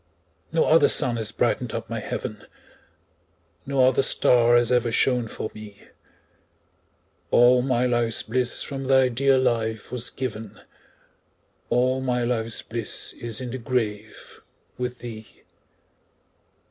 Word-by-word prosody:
No 165 0 +2
other 160 +1 +5
sun 125 -5 +2
has 110 -2 -2
brightened 120 +1 -1
up 115 0 -5
my 115 0 -4
heaven, 105 0 -6 1.2
No 135 -2 +3
other 130 +1 +3
star 120 -2 +4
has 120 0 +3
ever 120 -2 +2
shone 125 0 +1
for 110 - -6
me; 105 -2 -13 1.4
All 125 +1 +5
my 125 -1 0
life's 120 -2 0
bliss 125 +2 -1
from 135 -2 -6
thy 130 -1 +4
dear 135 +2 +2
life 110 -4 -1
was 125 -1 -3
given, 110 -5 -6 1.1
All 130 +2 +1
my 125 -2 -1
life's 115 -2 -2
bliss 115 -1 -3
is 115 -2 -4
in 125 -2 -5
the 130 - -5
grave 110 -3 -4 0.3
with 125 0 -4
thee. 110 -4 -11
120 Hz, 130 wpm, -24 LUFS, 115-130 Hz, 1.4 s, other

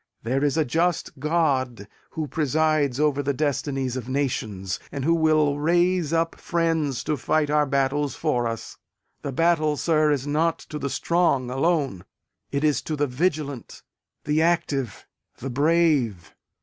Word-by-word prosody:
There 130 +5 0
is 145 +1 +1
a 160 - +2
just 165 +1 -1
God 135 - 0 0.2
who 155 -2 -4
presides 150 -1 +1
over 150 -2 +2
the 140 0 -1
destinies 135 -3 -1
of 130 -1 -5
nations, 110 -9 -2
and 140 -2 -4
who 165 - +4
will 155 -3 +2
raise 175 +1 +2
up 165 0 +1
friends 165 -6 0
to 155 - 0
fight 150 +2 0
our 150 -1 +3
battles 140 +1 0
for 125 -7 0
us. 115 -1 -6 0.4
The 140 - -4
battle, 155 0 +2
sir, 155 -1 +2
is 140 -2 0
not 160 +3 +1 0.2
to 150 - -3
the 140 - -2
strong 140 -7 +1
alone; 135 - 0 0.5
it 140 +1 -1
is 150 -2 +2
to 155 - -3
the 145 0 +1
vigilant, 145 -1 -2 0.4
the 150 +2 +1
active, 160 - 0 0.3
the 135 +2 -5
brave. 140 - +1
145 Hz, 150 wpm, -24 LUFS, 135-160 Hz, 0.5 s, who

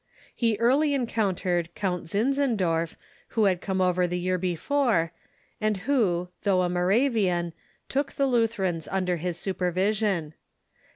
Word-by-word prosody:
He 230 -3 +1
early 280 +6 +3
encountered 185 -8 -1
Count 180 -4 -2
Zinzendorf, 205 - 0 0.4
who 220 - +5
had 185 -3 +2
come 190 -1 -2
over 180 -1 +2
the 180 +1 -2
year 185 +1 0
before, 185 - +1 0.5
and 215 -1 +1
who, 190 -11 +1
though 190 -3 +2
a 180 - 0
Moravian, 180 -2 +1 0.3
took 270 0 -1
the 275 - +1
L'.ither 230 -5 +1
ans 165 -3 -2
under 185 -2 0
his 175 +1 -3
supervision. 185 -1 0
190 Hz, 130 wpm, -26 LUFS, 175-230 Hz, 0.5 s, who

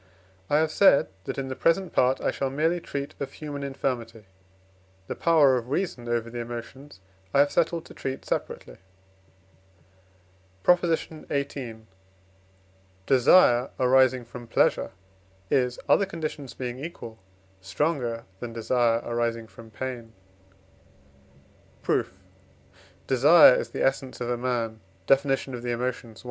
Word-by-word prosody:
I 145 - +3
have 155 0 +1
said, 195 -6 +5 0.2
that - - -4
in 135 -1 -3
the 130 - -4
present 175 +5 +1
part 130 +1 +3
I - - +1
shall 135 - -2
merely 160 +6 0
treat 140 -4 -5
of 140 -1 -5
human 145 -2 -6
infirmity. 120 -5 -4 0.8
The - - -4
power 150 -6 +4
of 120 +1 -11
reason 135 -7 -2
over 120 -1 -1
the 120 +1 -6
emotions 120 +1 -8 0.3
I - - +5
have 145 - +2
settled 170 -1 0
to - - -13
treat 135 0 -5
separately. - - -4 1.9
PROP. 180 0 +5
XVIII. 140 -7 -3 1.2
Desire 130 - +5
arising 130 -1 +4
from 120 0 -10
pleasure - - +2 0.6
is, 125 -2 +1
other 200 - +4
conditions 155 -6 -6
being 125 +1 -5
equal, 115 -9 -8 0.4
stronger 120 - -2 0.2
than 120 -1 -6
desire 115 0 +1
arising 115 -1 -2
from 115 0 -14
pain. 120 0 -6 1.7
Proof. - - 0 0.9
Desire 145 +3 +7
is - - -2
the - - -1
essence 135 -1 -1
of 120 0 -3
a - - +1
man 120 -3 -2 0.3
(Def. 135 +5 +4
of 135 -2 -2
the 120 - -4
Emotions, 120 -2 -4
i.) - - -13
130 Hz, 130 wpm, -26 LUFS, 120-145 Hz, 1.9 s, Desire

